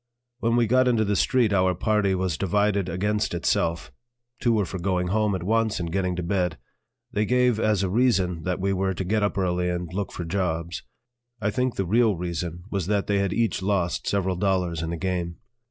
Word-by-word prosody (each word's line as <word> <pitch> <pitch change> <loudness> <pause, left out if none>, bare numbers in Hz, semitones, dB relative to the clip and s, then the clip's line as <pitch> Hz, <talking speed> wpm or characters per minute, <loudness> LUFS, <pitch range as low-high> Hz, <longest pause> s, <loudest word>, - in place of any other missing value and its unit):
When 115 0 +1
we 120 -1 +4
got 130 +3 +3
into 115 -3 +3
the 105 0 +1
street 120 -1 +2
our 95 -1 +3
party 100 0 +1
was 90 -3 -1
divided 100 +1 +1
against 105 +2 -1
itself; 85 0 0 0.5
two 120 - +2
were 105 -3 +2
for 90 +2 -6
going 90 0 0
home 105 0 +1
at 90 - -4
once 110 +2 +1
and 85 -2 -3
getting 90 -1 0
to 90 - -3
bed. 90 -2 0 0.5
They 105 -4 0
gave 125 0 +2
as 105 -3 +2
a - - +1
reason 95 -7 +2
that 90 +3 -2
we 95 +1 0
were 95 0 0
to 95 - -3
get 105 +4 0
up 100 0 0
early 90 -1 0
and 90 -1 -3
look 100 +1 -3
for 85 - -5
jobs. 85 -1 -2 0.6
I 105 -1 0
think 125 +1 -1
the 95 - -1
real 110 +2 +3
reason 85 0 -4
was 95 -4 -2
that 100 -1 +1
they 100 -1 +1
had 100 -2 0
each 115 -4 0
lost 95 -3 -1
several 95 -2 0
dollars 90 -4 0
in 80 - -3
the 85 - -3
game. 90 -1 -2
95 Hz, 210 wpm, -25 LUFS, 90-105 Hz, 0.6 s, we